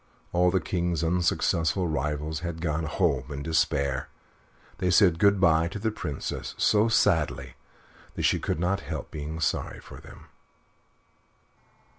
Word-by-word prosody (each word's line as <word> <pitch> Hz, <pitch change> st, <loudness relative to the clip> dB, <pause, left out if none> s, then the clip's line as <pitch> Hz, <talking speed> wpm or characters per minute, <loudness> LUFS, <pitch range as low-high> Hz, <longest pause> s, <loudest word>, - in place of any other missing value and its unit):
All 90 Hz, +1 st, +4 dB
the 95 Hz, +1 st, +2 dB
King's 85 Hz, 0 st, -1 dB
unsuccessful 85 Hz, 0 st, +1 dB
rivals 75 Hz, +1 st, -2 dB
had 85 Hz, -2 st, -5 dB
gone 80 Hz, -1 st, -1 dB
home 75 Hz, -5 st, 0 dB
in 70 Hz, 0 st, -5 dB
despair. 70 Hz, -5 st, 0 dB, 0.7 s
They 90 Hz, -, +1 dB
said 90 Hz, -2 st, +4 dB
good 100 Hz, 0 st, +4 dB
by 80 Hz, -2 st, +4 dB
to 90 Hz, -, -6 dB
the 110 Hz, +2 st, -1 dB
Princess 75 Hz, -9 st, -5 dB
so 105 Hz, +1 st, +3 dB
sadly 80 Hz, -, +1 dB, 0.6 s
that -, -, -3 dB
she -, -, +3 dB
could -, -, -2 dB
not 90 Hz, +3 st, 0 dB
help -, -, -6 dB
being 75 Hz, +1 st, -5 dB
sorry 70 Hz, -, -1 dB
for -, -, -12 dB
them. -, -, -14 dB
80 Hz, 140 wpm, -27 LUFS, 75-90 Hz, 0.7 s, All